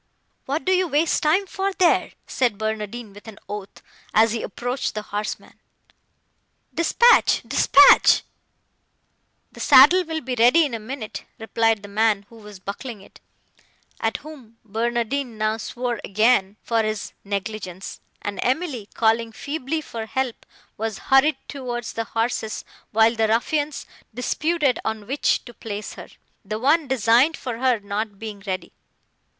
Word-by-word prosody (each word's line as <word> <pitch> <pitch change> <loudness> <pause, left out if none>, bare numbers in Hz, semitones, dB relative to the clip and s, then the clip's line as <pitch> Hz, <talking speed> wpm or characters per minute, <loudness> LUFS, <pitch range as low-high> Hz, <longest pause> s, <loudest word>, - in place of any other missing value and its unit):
"What 280 +1 -2
do 370 - +2
you 370 -1 +3
waste 310 +1 +1
time 335 +6 +2
for, 390 +1 -2
there?" 360 -2 +2
said 240 -6 0
Barnardine 220 0 -4
with 205 +2 -14
an 215 -2 -10
oath, 205 -1 -8 0.3
as 225 +1 +5
he 230 - -2
approached 245 +5 -3
the 215 - -3
horsemen. 210 +1 -5 1.1
"Dispatch—dispatch!" 380 0 +5 1.3
"The - - -14
saddle 295 +7 +7
will 320 -1 -4
be 255 0 -4
ready 245 +8 +5
in 275 - -5
a 230 - -3
minute," 220 0 -7
replied 225 -1 0
the - - -8
man 210 -1 +1
who 230 - -15
was 210 -2 -12
buckling 205 +3 -7
it, - - -18 0.8
at 225 0 -1
whom 255 -8 -12
Barnardine 235 +3 -2
now 215 +1 0
swore 240 +1 -4
again, 215 -1 +2
for 230 -1 +1
his 215 -1 -3
negligence, 200 -2 -5 0.2
and 205 -2 -4
Emily, 255 - -1
calling 225 0 +2
feebly 290 +5 -4
for 225 -6 -7
help, 260 0 -3 0.3
was 220 -1 -3 0.2
hurried 290 +3 +5
towards 240 -4 -5
the 225 - -3
horses, 225 0 -2 0.2
while 225 +1 +4
the 225 -1 +1
ruffians 290 +6 0 0.3
disputed 285 +4 0
on 220 -1 -3
which 275 +6 0
to 240 - -11
place 210 -2 -6
her, - - -10 0.4
the 215 +1 -4
one 290 +6 +2
designed 255 +4 +3
for 240 -3 -5
her 255 -3 +2
not 205 0 -4
being 210 -1 -7
ready. 185 -2 -4
230 Hz, 145 wpm, -23 LUFS, 215-270 Hz, 1.3 s, saddle